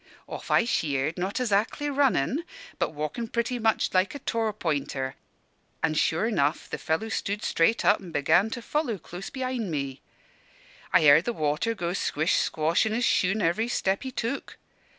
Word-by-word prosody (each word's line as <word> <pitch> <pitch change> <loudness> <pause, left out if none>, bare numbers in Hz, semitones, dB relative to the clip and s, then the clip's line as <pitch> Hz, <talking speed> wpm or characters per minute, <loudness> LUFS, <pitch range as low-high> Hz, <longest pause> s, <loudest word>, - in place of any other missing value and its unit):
"Off - - -8
I - - +4
sheered, 150 - 0
not 190 +3 -2
azackly 225 +4 0
runnin', 275 - +2 0.4
but - - 0
walkin' 155 +10 -3
pretty 235 +2 -1
much 220 -1 +1
like 185 +7 +2
a - - -5
Torpointer; 165 - -2 0.7
an' 155 - +2
sure 165 +8 +1
'nough 145 -6 0
the - - -5
fellow 160 +8 -1
stood 205 -1 -2
up - - -5
straight 170 +8 +2
and 195 -4 +2
began 160 +7 +3
to 240 +1 -6
follow 295 -5 -1
close 180 +2 -8
behind 255 -5 -3
me. 140 -4 -3 0.9
I - - +5
heard 155 +4 +7
the 240 - -1
water 155 +7 0
go 175 -3 -2
squish 160 -3 +1
squash 160 +6 +1
in 215 - -1
his 240 +2 +1
shoon, 195 +2 +2
every 175 +8 +1
step 195 -5 0
he 265 - -4
took. 245 +2 -4
200 Hz, 170 wpm, -27 LUFS, 155-230 Hz, 0.9 s, heard